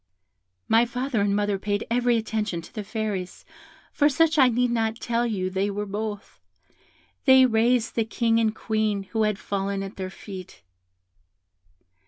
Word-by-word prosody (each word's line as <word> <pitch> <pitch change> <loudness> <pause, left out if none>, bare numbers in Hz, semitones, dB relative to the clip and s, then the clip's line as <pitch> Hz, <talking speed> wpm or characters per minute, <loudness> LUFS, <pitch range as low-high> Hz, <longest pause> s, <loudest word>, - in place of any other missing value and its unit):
"My 225 +1 +5
father 245 -1 -2
and 200 0 +1
mother 205 -1 0
paid 205 +1 -2
every 240 0 +2
attention 215 -5 -2
to - - -14
the 215 - -5
Fairies, 205 -4 -4 0.5
for 290 0 +3
such 315 +1 +2
I 260 -2 +7
need 245 +1 +1
not 225 -1 -1
tell 240 0 0
you 185 -4 -2
they 195 +2 0
were 205 +1 -3
both. 205 +1 -5 0.9
They 265 -1 +7
raised 230 0 +2
the 230 - +1
King 230 0 +1
and 220 -1 +1
Queen, 215 -3 -1
who 225 - 0
had 210 -2 0
fallen 195 -1 -3
at 195 +1 -8
their 190 -1 -4
feet. 185 - -10
220 Hz, 160 wpm, -25 LUFS, 200-235 Hz, 0.9 s, I